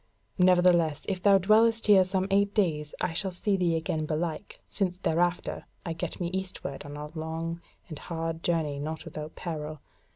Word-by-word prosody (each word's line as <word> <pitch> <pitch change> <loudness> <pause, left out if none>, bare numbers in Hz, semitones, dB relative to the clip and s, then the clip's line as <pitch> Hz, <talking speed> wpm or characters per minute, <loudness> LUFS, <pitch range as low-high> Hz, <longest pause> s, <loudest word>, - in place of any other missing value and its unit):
Nevertheless, 175 -4 +4
if 190 -2 -2
thou 200 0 +6
dwellest 220 +4 +4
here 200 -3 +7
some 185 0 -1
eight 200 +1 +2
days 150 -7 0
I 180 - 0
shall 190 +3 -2
see 195 +3 0
thee 175 -3 +1
again 155 -1 -1
belike, 160 +4 -3
since 185 -3 -1
thereafter 175 -1 0 0.2
I 165 - -2
get 170 +1 -5
me 175 -2 -1
eastward 185 -7 -4
on 145 - -8
a - - -6
hard - - -22 0.7
and 155 -4 -8
long 165 -1 -2
journey 160 -5 0
not 155 +2 -5
without 155 0 -7
peril. 155 -3 -5
175 Hz, 170 wpm, -28 LUFS, 155-190 Hz, 0.7 s, here